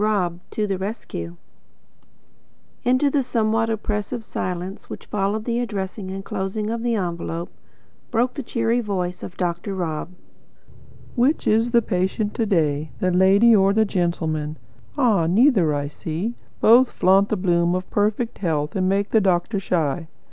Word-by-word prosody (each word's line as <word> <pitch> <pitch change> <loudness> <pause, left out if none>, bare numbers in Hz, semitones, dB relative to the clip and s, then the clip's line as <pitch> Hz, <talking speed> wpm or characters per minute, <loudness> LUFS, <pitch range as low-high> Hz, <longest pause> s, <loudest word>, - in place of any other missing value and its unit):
ROB 185 -5 0
TO 215 - -1
THE 195 -2 -2
RESCUE 140 - -5 1.5
Into 255 +3 +3
the 285 - +2
somewhat 225 -2 0
oppressive 215 +1 -3
silence 180 +1 -5
which - - -8
followed 210 +2 -1
the 235 0 0
addressing 200 -4 -4
and 195 +1 -6
closing 210 +3 -3
of 230 0 -3
the 235 -1 0
envelope, 170 -3 -3 0.6
broke 245 +2 +1
the 280 - -4
cheery 230 -1 0
voice 185 -5 -3
of 180 - -8
Dr. 175 +2 -2
Rob. 165 -4 -3 1.0
"Which 265 +5 +2
is 225 +2 +3
the 235 -1 +3
patient 195 +2 -1
to 225 - -1
day? 155 -5 +1
The 185 - +1
lady 195 +5 +5
or 195 -1 +4
the 220 +1 +3
gentleman? 160 -5 -1 0.4
Ah, 200 -10 +3
neither, 195 - +4
I 145 -1 -1
see. 165 +9 -4 0.3
Both 240 +3 +6
flaunt 195 +2 +3
the 215 - 0
bloom 175 -1 +2
of 185 0 -3
perfect 215 +3 0
health 155 -4 -1
and 185 -1 +1
make 200 +1 0
the 220 - +4
doctor 190 +2 +1
shy. 165 -4 -1
195 Hz, 155 wpm, -22 LUFS, 175-225 Hz, 1.5 s, Both